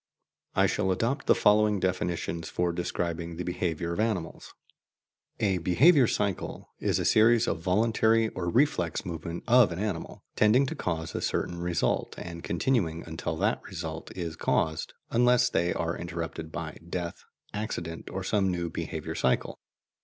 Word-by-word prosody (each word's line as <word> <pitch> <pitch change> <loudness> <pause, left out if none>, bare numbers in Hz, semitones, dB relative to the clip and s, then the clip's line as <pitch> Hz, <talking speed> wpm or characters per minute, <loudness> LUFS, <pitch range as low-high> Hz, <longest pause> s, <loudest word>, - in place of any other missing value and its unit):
I - - +5
shall 95 - +1
adopt 120 +9 -1
the - - +6
following 105 0 +4
definitions 85 -3 -2
for 90 0 0
describing 85 -1 -3
the 90 - -3
behaviour 85 -1 -2
of 85 - -4
animals: 105 -7 -2 0.8
A 95 -4 +1
"behaviour 125 - +5
cycle" 100 -4 -2
is - - +1
a - - -1
series 115 +2 +5
of - - -1
voluntary 110 +4 +2
or 90 -4 -3
reflex 105 - +1
movements 85 0 -5
of 120 -6 +6
an 85 - -4
animal, 100 -4 -4
tending 115 +6 +4
to - - -4
cause 80 -2 -3
a - - -3
certain 85 - -1
result, 85 -1 0
and 85 -1 -7
continuing 85 -4 0
until 80 -1 -4
that - - 0
result 80 -2 -6
is 85 -3 -4
caused, 80 0 0 0.2
unless 125 +1 +4
they 85 +1 +1
are 85 +1 -1
interrupted 85 -2 -5
by 80 0 -6
death, 85 -1 -4 0.3
accident, 85 -6 -4
or 95 - -4
some 95 0 +1
new 85 -2 -2
behaviour - - -4
cycle. 65 - 0
90 Hz, 155 wpm, -28 LUFS, 85-110 Hz, 0.8 s, the